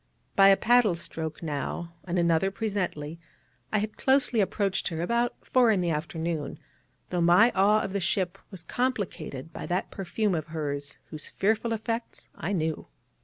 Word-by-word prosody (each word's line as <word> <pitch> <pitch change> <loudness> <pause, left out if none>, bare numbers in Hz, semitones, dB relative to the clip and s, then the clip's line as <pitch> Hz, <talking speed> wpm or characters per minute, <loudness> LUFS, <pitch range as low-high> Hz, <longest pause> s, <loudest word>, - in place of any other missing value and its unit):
By 195 0 +7
a 195 0 +7
paddle 240 -6 +4
stroke 160 -1 -6
now, 160 +3 -3
and 180 0 -2
another 170 +2 +3
presently, 185 -7 -3 0.5
I 215 - +2
had 210 +1 -2
closely 265 -3 +3
approached 195 0 0
her 165 -2 -3
about 235 +5 +1
four 250 -2 +4
in 210 -4 +3
the 175 -2 +1
afternoon, 160 -1 -3 0.5
though 180 -1 0
my 180 +8 +6
awe 205 +3 +4
of 195 - -4
the 200 - 0
ship 185 -1 0
was 190 -5 -9
complicated 195 - -3
by - - -6
that 180 +2 -1
perfume 200 +1 -1
of 160 -2 -2
hers, 145 -3 -4
whose 155 -1 -6
fearful 220 +3 +1
effects 230 +1 -3
I 175 - -3
knew. 160 -4 -1
185 Hz, 165 wpm, -28 LUFS, 165-215 Hz, 0.5 s, By